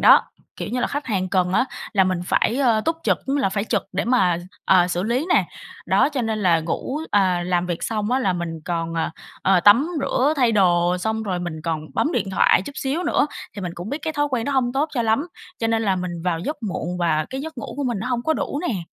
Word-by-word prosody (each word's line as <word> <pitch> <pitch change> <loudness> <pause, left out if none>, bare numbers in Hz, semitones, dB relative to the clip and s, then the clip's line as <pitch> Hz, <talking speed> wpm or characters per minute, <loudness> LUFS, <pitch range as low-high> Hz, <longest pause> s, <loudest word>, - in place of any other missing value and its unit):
đó. - - +7 0.3
Kiểu - - -5
như 250 +2 -2
là - - +1
khách 290 +1 -4
hàng 190 -5 -1
cần 180 -1 +1
á, 250 - +3 0.3
là 195 -3 +4
mình 185 -1 0
phải, 230 - +1
ơ, 240 -5 +3
túc 325 0 +1
trực, - - +2
ư, 275 +1 0
là 270 - +2
phải 200 +2 -2
trực 210 -4 0
để 190 - -1
mà, 195 -8 +3 0.3
ờ, 180 -2 +5
xử 175 0 -1
lý 240 - 0
nè. - - +4 0.4
Đó, - - +4
cho 280 -4 -2
nên 220 -1 -1
là 170 -3 +4
ngủ 170 - -3
à, 185 -3 +2
làm 180 -1 +1
việc 175 -2 -3
xong 215 0 -1
á, 255 - +3
là 195 -8 +1
mình 170 -2 -4
còn, 165 -1 -2
ờ, 165 -1 -1 0.3
ờ, 190 -2 +4
tắm 230 - +6
rửa 275 +2 +2
thay 245 -4 +3
đồ 175 -3 +3
xong 220 +3 -1
rồi 190 -4 -2
mình 165 -3 -5
còn 160 -2 -1
bấm 310 - +1
điện 195 - -1
thoại 190 - +4
chút 285 - -8
xíu 280 +6 -2
nữa. - - +2 0.3
Thì 200 - -5
mình 180 -2 -4
cũng 175 +4 -7
biết 285 +5 -3
cái 315 - -2
thói 290 -1 +1
quen 245 -4 -1
đó 285 - -1
hông 250 -3 +1
tốt 285 +4 0
cho 240 - +1
lắm, 225 +8 +1 0.3
cho 225 - 0
nên 225 0 +1
là 195 -3 +1
mình 175 -2 -4
vào 175 -2 0
giấc 290 - -3
muộn 180 -3 -3
và 155 -3 +1
cái 265 - -4
giấc 315 -1 -7
ngủ - - -6
của 285 - -2
mình 240 -5 -1
nó 230 - -4
hông 245 -2 -1
có 315 - +1
đủ 285 - -3
nè. 190 -7 -2
205 Hz, 265 wpm, -22 LUFS, 180-255 Hz, 0.4 s, đó